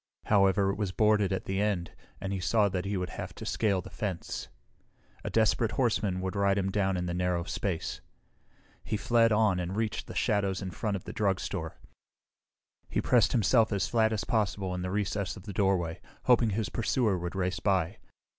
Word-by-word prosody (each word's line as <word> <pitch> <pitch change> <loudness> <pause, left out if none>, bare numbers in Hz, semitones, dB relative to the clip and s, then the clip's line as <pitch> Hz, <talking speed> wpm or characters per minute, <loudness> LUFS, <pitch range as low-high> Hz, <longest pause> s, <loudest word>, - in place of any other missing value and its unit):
However, 100 -1 +4
it - - -5
was 105 -3 -1
boarded 105 -1 +3
at 95 - -2
the 95 +1 -1
end 100 -5 -1 0.3
and 95 0 -3
he 95 - -2
saw 100 +4 +2
that 90 -1 -3
he 100 0 -1
would 90 -1 -3
have - - -6
to - - -8
scale 100 -4 +1
the - - -11
fence. 95 -5 -4 0.8
A - - -3
desperate 110 0 +2
horseman 105 -7 +1
would 95 +1 -3
ride 100 0 +2
him 95 -1 0
down 95 -2 +1
in 90 - -2
the 85 - -2
narrow 90 -1 0
space. 90 -1 -3 0.8
He 110 - -2
fled 115 +2 +3
on 105 -4 +3
and 90 +2 -3
reached 110 -1 -2
the - - -8
shadows 100 -2 +1
in 95 -2 -5
front 105 +4 -2
of 95 - -5
the - - -7
drugstore. 100 -3 -2 1.1
He - - 0
pressed - - +3
himself 115 0 +3
as 95 -7 0
flat 110 +2 +2
as 110 0 -1
possible 100 -5 -1
in 90 - -3
the 90 - -3
recess 100 -1 -2
of 95 - -11
the 100 -1 -7
doorway, 90 -4 0 0.2
hoping 120 -2 +4
his 105 +1 -1
pursuer 115 -3 +1
would 85 +1 -5
race 95 0 -1
by. 95 0 +1
100 Hz, 195 wpm, -29 LUFS, 90-105 Hz, 1.1 s, However